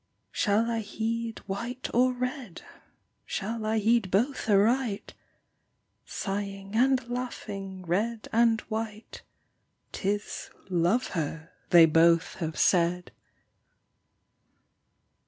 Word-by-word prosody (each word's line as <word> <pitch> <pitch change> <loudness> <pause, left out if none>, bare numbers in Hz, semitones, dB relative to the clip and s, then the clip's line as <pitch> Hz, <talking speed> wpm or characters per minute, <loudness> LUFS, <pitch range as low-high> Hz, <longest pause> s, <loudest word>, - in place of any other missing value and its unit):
Shall 210 +3 +2
I 230 -1 -1
heed 225 +2 -3
white 235 +6 -4
or 255 +2 +4
red? 250 - -5 0.6
Shall 215 +2 -3
I 220 +1 +1
heed 220 -1 +2
both 230 +6 0
aright? 215 +2 +2 0.9
Sighing 195 0 -4
and 255 +1 +3
laughing, 200 -6 -5
red 215 +6 -1
and 230 -1 +4
white, 220 -1 -6 0.7
'Tis 205 +1 -3
" - - -28
Love 180 +8 +2
her 160 -1 -4
" - - -39
they 170 -2 +8
both 165 +1 +3
have 160 -2 -4
said. 180 0 +2
215 Hz, 100 wpm, -28 LUFS, 190-235 Hz, 0.9 s, they